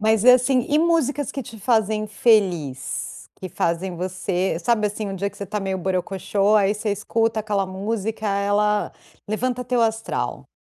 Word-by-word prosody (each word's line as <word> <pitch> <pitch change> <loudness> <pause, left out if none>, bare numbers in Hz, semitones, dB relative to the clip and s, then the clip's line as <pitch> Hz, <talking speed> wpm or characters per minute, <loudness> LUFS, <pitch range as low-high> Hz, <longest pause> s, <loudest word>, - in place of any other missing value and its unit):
Mas 220 0 +2
assim, 250 0 +5
e 295 +1 +3
músicas 315 -4 +1
que 275 - -4
te 225 0 -11
fazem 215 -1 +1
feliz? 180 - 0
Que 185 - -7
fazem 175 +2 -2
você 185 0 -2
sabe 215 +3 +2
assim 210 +1 -5
um 195 - -4
dia 200 +2 -2
que 200 - -19
você 200 - -5
está 210 +2 -3
meio 190 -1 -2
borocoxô, 195 +3 +1
aí 200 0 +3
você 210 0 -2
escuta 225 +2 0
aquela 205 -2 0
música 215 +3 -3
ela 205 +1 +1 0.4
levanta 250 +3 -1
teu 245 0 0
astral. 225 0 -2
210 Hz, 165 wpm, -22 LUFS, 195-225 Hz, 0.4 s, assim